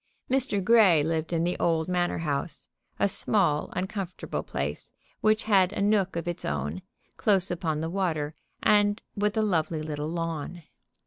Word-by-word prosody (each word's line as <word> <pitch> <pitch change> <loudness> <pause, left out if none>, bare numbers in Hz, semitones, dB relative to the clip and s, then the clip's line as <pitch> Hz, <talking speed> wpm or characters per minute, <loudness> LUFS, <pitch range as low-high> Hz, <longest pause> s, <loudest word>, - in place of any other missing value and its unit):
Mr. 260 -7 +1
Grey 200 -8 +6
lived 160 +1 -1
in 165 -1 +1
the 175 +1 0
old 160 -1 +1
Manor 180 -1 0
house, 150 -1 -2 0.3
a - - +3
small, 190 -6 +1
uncomfortable 190 -1 -3
place, - - -4 0.3
which 215 0 +2
had 195 -4 +4
a - - -4
nook 200 -2 +2
of 170 +1 -3
its 175 - -4
own, 75 +5 -3 0.4
close 195 -4 +2
upon 160 -3 -1
the 160 - -2
water, 165 -6 -1 0.3
and 205 0 +3
with 210 +1 0
a 220 - +3
lovely 165 -5 0
little 150 0 -3
lawn. 165 0 -4
175 Hz, 155 wpm, -27 LUFS, 160-200 Hz, 0.4 s, Grey